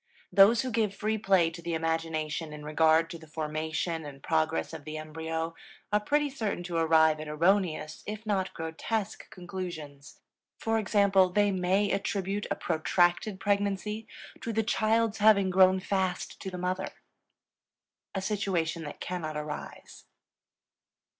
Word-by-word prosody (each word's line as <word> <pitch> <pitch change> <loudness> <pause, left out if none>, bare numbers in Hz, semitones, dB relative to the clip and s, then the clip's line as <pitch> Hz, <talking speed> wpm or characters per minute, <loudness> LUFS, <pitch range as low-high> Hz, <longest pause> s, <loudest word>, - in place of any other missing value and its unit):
Those 200 +6 +6
who 255 - -3
give 220 -3 0
free 220 +1 -1
play 190 -5 +3
to 170 +1 -9
the 170 0 -2
imagination 160 -1 -2
in 150 0 -9
regard 160 +1 +4
to 170 - -7
the 160 - -14
formation 160 +1 -3
and 140 -2 -10
progress 160 0 0
of 160 -2 -7
the 155 +1 -6
embryo 160 +1 -4 0.4
are 210 - +5
pretty 295 +7 +1
certain 220 -10 -3
to 175 -1 -3
arrive 160 -1 +4
at 155 - -6
erroneous 165 0 +1
if 215 +1 -5
not 195 -3 0
grotesque 190 +6 -3
conclusions; 170 -6 -8 0.4
for 225 0 0
example, 200 -3 +4
they 205 +2 +2
may 190 +2 +1
attribute 195 0 -1
a - - 0
protracted 175 +4 +1
pregnancy 205 +2 -1 0.3
to 230 - -3
the 225 0 +1
child's 220 0 +1
having 200 -3 +5
grown 185 0 +5
fast 185 -1 -2
to 190 - -4
the 180 - -6
mother, 185 +1 -2 1.3
a 190 - -2
situation 185 -5 -1
that 145 - -8
cannot 160 -4 -4
arise. 150 0 -7
180 Hz, 145 wpm, -29 LUFS, 160-205 Hz, 1.3 s, Those